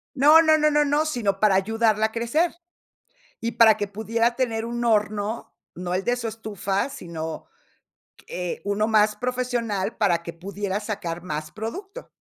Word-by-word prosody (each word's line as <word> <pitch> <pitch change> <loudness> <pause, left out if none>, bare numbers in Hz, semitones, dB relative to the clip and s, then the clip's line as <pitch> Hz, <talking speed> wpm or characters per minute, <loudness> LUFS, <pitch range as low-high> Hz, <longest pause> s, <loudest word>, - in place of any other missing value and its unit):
No, 300 +4 +7
no, 315 -1 +5
no, 305 0 +3
no, 295 +2 +2
sino, 215 -10 -1
para 210 -3 +4
ayudarla 220 +2 +2
a - - -16
crecer. 235 +11 0 0.9
Y 230 +1 -2
para 220 -2 +6
que 205 - -2
pudiera 225 +4 0
tener 230 -3 -1
un 240 +1 -3
horno, 215 0 0 0.2
no 180 0 -4
el 190 - -1
de 245 0 +1
su 235 -2 -4
estufa, 205 -1 -2
sino, 160 - -6 0.8
eh, 180 -1 -4
uno 205 +2 +1
más 210 -1 +3
profesional 240 -4 -2
para 175 -5 +2
que 170 - -7
pudiera 200 +3 -4
sacar 175 -6 -4
más 155 -3 -5
producto. 385 - -7
220 Hz, 155 wpm, -24 LUFS, 195-240 Hz, 0.9 s, No